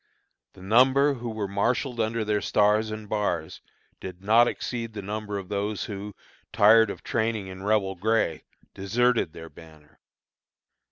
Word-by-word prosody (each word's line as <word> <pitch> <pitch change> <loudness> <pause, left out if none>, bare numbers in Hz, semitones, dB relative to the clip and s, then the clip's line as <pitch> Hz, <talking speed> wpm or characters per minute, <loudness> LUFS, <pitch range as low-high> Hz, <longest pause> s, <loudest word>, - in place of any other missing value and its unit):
The 95 - -15
number 130 +7 +4
who 120 -2 -6
were 110 -2 -3
marshalled 120 +5 -1
under 110 0 -1
their 105 -1 0
stars 105 +1 +2
and 110 0 -7
bars 90 -6 -2 0.4
did 90 0 -9
not 115 +4 +5
exceed 115 -3 -4
the 105 - -6
number 105 0 -4
of 95 -2 -7
those 100 +1 -3
who, 105 -2 -7 0.4
tired 110 +1 +5
of - - -7
training 110 -3 -1
in 95 0 -9
Rebel 100 -1 +1
gray, 95 -5 0 0.3
deserted 115 -1 0
their 80 0 -10
banner. 80 -2 -17
105 Hz, 150 wpm, -26 LUFS, 95-115 Hz, 0.4 s, not